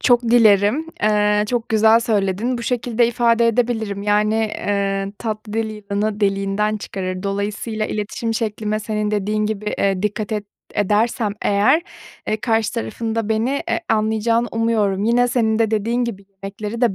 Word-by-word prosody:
çok 245 Hz, -1 st, +4 dB
dilerim, 230 Hz, +4 st, +4 dB, 0.2 s
eee, 210 Hz, 0 st, +3 dB
çok 240 Hz, -2 st, -1 dB
güzel 220 Hz, +1 st, +5 dB
söyledin. 220 Hz, +2 st, 0 dB
Bu -, -, -5 dB
şekilde 240 Hz, -1 st, +1 dB
ifade 235 Hz, 0 st, +2 dB
edebilirim. 220 Hz, -4 st, -1 dB
Yani, 210 Hz, +1 st, +2 dB
eee, 200 Hz, -2 st, -1 dB
tatlı 215 Hz, -2 st, -5 dB
dil 225 Hz, 0 st, 0 dB
yılanı 210 Hz, 0 st, -3 dB
deliğinden 200 Hz, +1 st, 0 dB
çıkarır. 185 Hz, -2 st, -5 dB
Dolayısıyla 210 Hz, +2 st, -2 dB
iletişim 220 Hz, +2 st, -3 dB
şeklime 215 Hz, -1 st, -2 dB
senin 210 Hz, -1 st, -2 dB
dediğin 210 Hz, +1 st, 0 dB
gibi, 210 Hz, -1 st, -3 dB
eee, 195 Hz, -1 st, +1 dB
dikkat 210 Hz, +1 st, -2 dB
ed 210 Hz, -1 st, -2 dB, 0.3 s
edersem 210 Hz, +2 st, +1 dB
eğer, 210 Hz, +11 st, +3 dB, 0.5 s
eee, 215 Hz, -, +1 dB
karşı 225 Hz, -2 st, +1 dB
tarafın 220 Hz, -, -3 dB
da 225 Hz, -2 st, -1 dB
beni 220 Hz, +3 st, +1 dB, 0.2 s
e -, -, 0 dB
anlayacağını 220 Hz, +2 st, +1 dB
umuyorum. 215 Hz, -4 st, +1 dB
Yine 245 Hz, +2 st, +3 dB
senin 225 Hz, -2 st, +1 dB
de 225 Hz, -2 st, +2 dB
dediğin 230 Hz, +3 st, 0 dB
gibi 200 Hz, -5 st, -5 dB
yemekleri 200 Hz, +3 st, -7 dB
de 235 Hz, -6 st, +2 dB
215 Hz, 150 wpm, -20 LUFS, 205-230 Hz, 0.5 s, güzel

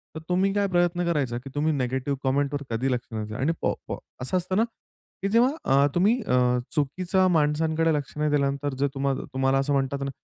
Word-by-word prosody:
तर -, -, -4 dB
तुम्ही 190 Hz, +2 st, +2 dB
काय 200 Hz, 0 st, +1 dB
प्रयत्न 175 Hz, -1 st, +1 dB
करायचा 140 Hz, -8 st, 0 dB
की 130 Hz, +3 st, -8 dB
तुम्ही 155 Hz, +2 st, +1 dB
निगेटिव्ह 130 Hz, +1 st, -1 dB
कमेंटवर 140 Hz, +1 st, 0 dB
कधी 120 Hz, +4 st, 0 dB
लक्ष 125 Hz, -1 st, -2 dB
नाही 110 Hz, -1 st, -3 dB
द्यायचं. 110 Hz, +3 st, -6 dB
आणि 160 Hz, -, +2 dB
पॉ -, -, +1 dB
पॉ -, -, -3 dB, 0.3 s
असं 130 Hz, +9 st, 0 dB
असतं 185 Hz, +1 st, -2 dB
ना 220 Hz, -, +5 dB, 0.6 s
की 195 Hz, -, 0 dB
जेव्हा 235 Hz, +5 st, +4 dB, 0.2 s
अ, 140 Hz, +1 st, +5 dB
तुम्ही 205 Hz, +8 st, +3 dB
अ, -, -, -1 dB, 0.4 s
चुकीच्या 180 Hz, +6 st, +1 dB
माणसांकडे 160 Hz, 0 st, +2 dB
लक्ष 145 Hz, 0 st, -3 dB
नाही 150 Hz, 0 st, +1 dB
दिल्यानंतर 140 Hz, 0 st, 0 dB
जर 140 Hz, -, +3 dB
तुम्हा 135 Hz, 0 st, 0 dB, 0.2 s
तुम्हाला 135 Hz, 0 st, +2 dB
असं 140 Hz, +1 st, 0 dB
म्हणतात 140 Hz, 0 st, 0 dB
ना, 140 Hz, -, -2 dB
145 Hz, 205 wpm, -26 LUFS, 135-175 Hz, 0.6 s, ना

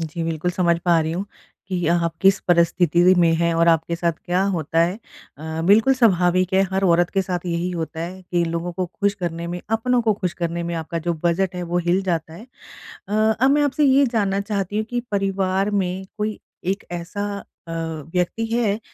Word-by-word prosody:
जी, 165 Hz, +1 st, -4 dB
बिल्कुल 165 Hz, +1 st, -1 dB
समझ 170 Hz, -2 st, +1 dB
पा 170 Hz, -2 st, +4 dB
रही 160 Hz, 0 st, -2 dB
हूँ 185 Hz, +4 st, -3 dB, 0.4 s
कि 180 Hz, -3 st, -1 dB
आप 170 Hz, -1 st, +1 dB
किस 195 Hz, 0 st, +5 dB
परिस्थिति 175 Hz, +1 st, +4 dB
में 170 Hz, -1 st, +4 dB
हैं 170 Hz, +1 st, +1 dB
और 170 Hz, +1 st, +3 dB
आपके 165 Hz, +1 st, +2 dB
साथ 170 Hz, 0 st, 0 dB
क्या 180 Hz, +2 st, +1 dB
होता 165 Hz, 0 st, 0 dB
है। 175 Hz, +5 st, +1 dB, 0.4 s
अ, 160 Hz, +1 st, -5 dB
बिल्कुल 220 Hz, +7 st, +5 dB
स्वाभाविक 185 Hz, -6 st, +3 dB
है 190 Hz, -, +5 dB
हर 190 Hz, +1 st, +1 dB
औरत 175 Hz, -1 st, +3 dB
के 195 Hz, -, +1 dB
साथ 180 Hz, -1 st, -4 dB
यही 170 Hz, +1 st, -1 dB
होता 165 Hz, -2 st, -4 dB
है 180 Hz, +3 st, -6 dB
कि 175 Hz, -1 st, 0 dB
लोगों 170 Hz, +1 st, -3 dB
को 180 Hz, +1 st, -2 dB
खुश 200 Hz, +3 st, -1 dB
करने 170 Hz, -3 st, -4 dB
में, 175 Hz, +1 st, -4 dB
अपनों 240 Hz, +3 st, +2 dB
को 220 Hz, -2 st, +3 dB
खुश 185 Hz, -3 st, -3 dB
करने 170 Hz, 0 st, -1 dB
में 170 Hz, 0 st, -3 dB
आपका 165 Hz, +1 st, -3 dB
जो 170 Hz, -, +1 dB
बजट 180 Hz, +2 st, +1 dB
है 180 Hz, -, -4 dB
वो 175 Hz, +1 st, -1 dB
हिल 180 Hz, +3 st, +2 dB
जाता 165 Hz, -4 st, -2 dB
है। 215 Hz, +8 st, -11 dB, 0.6 s
अ, 205 Hz, -, -5 dB, 0.3 s
अब 265 Hz, +3 st, +4 dB
मैं 295 Hz, +1 st, +3 dB
आपसे 290 Hz, +1 st, +1 dB
ये 275 Hz, +1 st, +5 dB
जानना 200 Hz, -3 st, +1 dB
चाहती 200 Hz, -1 st, -3 dB
हूँ 215 Hz, -, 0 dB
कि 245 Hz, 0 st, -1 dB
परिवार 195 Hz, 0 st, 0 dB
में 190 Hz, -1 st, -1 dB
कोई 210 Hz, 0 st, -2 dB, 0.2 s
एक 195 Hz, +3 st, -2 dB, 0.2 s
ऐसा 200 Hz, +4 st, -5 dB, 0.2 s
अ, -, -, -6 dB, 0.4 s
व्यक्ति 180 Hz, +5 st, 0 dB
है 225 Hz, -2 st, 0 dB
180 Hz, 205 wpm, -22 LUFS, 170-200 Hz, 0.6 s, किस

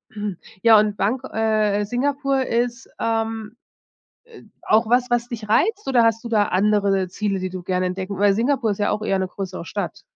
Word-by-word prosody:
Äh, 205 Hz, -2 st, -4 dB, 0.3 s
ja, 225 Hz, -2 st, +7 dB
und 210 Hz, -1 st, +1 dB
Bangko 245 Hz, +7 st, -1 dB
äh, 215 Hz, -2 st, +1 dB
Singapur 275 Hz, +3 st, 0 dB
ist, 240 Hz, +2 st, -1 dB
ähm, 225 Hz, -1 st, -2 dB, 0.9 s
äh, -, -, -22 dB
auch 220 Hz, +2 st, +3 dB
was, 250 Hz, +1 st, +3 dB
was 240 Hz, 0 st, 0 dB
dich 225 Hz, -3 st, -6 dB
reizt? 415 Hz, -, +1 dB
Oder 250 Hz, -3 st, +4 dB
hast 225 Hz, 0 st, +2 dB
du -, -, -2 dB
da 215 Hz, -3 st, +3 dB
andere 200 Hz, 0 st, +2 dB
Ziele, 195 Hz, +1 st, -2 dB
die 185 Hz, 0 st, -3 dB
du 185 Hz, -1 st, -7 dB
gerne 185 Hz, +1 st, -1 dB
entdecken 185 Hz, +2 st, -4 dB
Weil 205 Hz, -1 st, +4 dB
Singapur 235 Hz, +1 st, +1 dB
ist 200 Hz, -, -5 dB
ja 205 Hz, -, +1 dB
auch 210 Hz, -, -2 dB
eher 195 Hz, -2 st, 0 dB
'ne 190 Hz, 0 st, -1 dB
größere 185 Hz, -2 st, -6 dB
Stadt. -, -, -5 dB
215 Hz, 195 wpm, -22 LUFS, 200-240 Hz, 0.9 s, ja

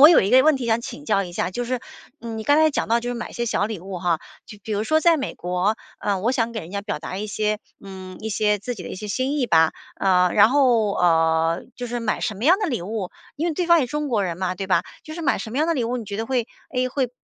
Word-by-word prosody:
我 295 Hz, -, +11 dB
有 340 Hz, -, +6 dB
一 195 Hz, -, 0 dB
个 260 Hz, +1 st, +7 dB
问 310 Hz, -2 st, +4 dB
题 260 Hz, -, -4 dB
想 230 Hz, 0 st, +1 dB
请 145 Hz, -10 st, -8 dB
教 195 Hz, +4 st, +1 dB
一 175 Hz, -, -9 dB
下， -, -, -1 dB
就 245 Hz, +6 st, -3 dB
是， 255 Hz, 0 st, -1 dB, 0.4 s
嗯， 225 Hz, -1 st, -5 dB
你 220 Hz, -, -4 dB
刚 290 Hz, +6 st, +4 dB
才 315 Hz, 0 st, +5 dB
讲 -, -, -2 dB
到 230 Hz, +1 st, +3 dB
就 245 Hz, +1 st, -3 dB
是 -, -, -3 dB
买 235 Hz, -, -5 dB
些 235 Hz, -, -2 dB
小 215 Hz, -3 st, 0 dB
礼 215 Hz, -4 st, -5 dB
物 190 Hz, -1 st, -6 dB
哈， 170 Hz, -2 st, +1 dB, 0.3 s
就 210 Hz, -, -11 dB
比 220 Hz, -, -5 dB
如 205 Hz, -, 0 dB
说 310 Hz, +8 st, +2 dB
在 330 Hz, -1 st, +4 dB
美 270 Hz, -, -4 dB
国， 180 Hz, +4 st, 0 dB, 0.2 s
呃， 200 Hz, -2 st, 0 dB
我 230 Hz, +6 st, +1 dB
想 235 Hz, -3 st, 0 dB
给 225 Hz, -2 st, -4 dB
人 165 Hz, -, -10 dB
家 200 Hz, +1 st, -3 dB
表 205 Hz, 0 st, -4 dB
达 185 Hz, -, -6 dB
一 210 Hz, -, -3 dB
些 215 Hz, 0 st, -1 dB, 0.3 s
嗯， 185 Hz, -1 st, -9 dB
一 220 Hz, +1 st, -4 dB
些 210 Hz, 0 st, +1 dB
自 245 Hz, +5 st, -4 dB
己 190 Hz, -, -8 dB
的 -, -, -7 dB
一 -, -, -6 dB
些 210 Hz, +2 st, -7 dB
心 260 Hz, +7 st, -1 dB
意 255 Hz, -, +1 dB
吧。 160 Hz, -5 st, +4 dB, 0.2 s
啊， 180 Hz, -2 st, +3 dB
然 210 Hz, +1 st, +6 dB
后， 240 Hz, -7 st, +3 dB
呃， 165 Hz, -1 st, +2 dB
就 245 Hz, 0 st, -4 dB
是 240 Hz, +1 st, -3 dB
买 225 Hz, -2 st, -1 dB
什 215 Hz, -4 st, -1 dB
么 210 Hz, -, -6 dB
样 350 Hz, +6 st, +6 dB
的 420 Hz, -, 0 dB
礼 245 Hz, -, -2 dB
物 200 Hz, 0 st, -4 dB, 0.3 s
因 320 Hz, -, -1 dB
为 340 Hz, -, 0 dB
对 345 Hz, +3 st, -1 dB
方 340 Hz, -1 st, +6 dB
也 255 Hz, -, 0 dB
中 300 Hz, +2 st, -3 dB
国 215 Hz, -6 st, +1 dB
人 170 Hz, -2 st, -3 dB
嘛， 185 Hz, -1 st, -1 dB
对 195 Hz, +1 st, -5 dB
吧？ 190 Hz, -, +3 dB, 0.2 s
就 310 Hz, -, -8 dB
是 340 Hz, -, -6 dB
买 315 Hz, -, +2 dB
什 220 Hz, -, -6 dB
么 250 Hz, -, -3 dB
样 310 Hz, -, +2 dB
的 335 Hz, -, +1 dB
礼 245 Hz, -5 st, 0 dB
物， 245 Hz, +2 st, -2 dB
你 225 Hz, -, -6 dB
觉 200 Hz, 0 st, -5 dB
得 225 Hz, -, -2 dB
会 250 Hz, -3 st, 0 dB, 0.3 s
诶， 255 Hz, 0 st, +1 dB
会 255 Hz, -1 st, -1 dB
220 Hz, 325 characters per minute, -23 LUFS, 195-255 Hz, 0.4 s, 我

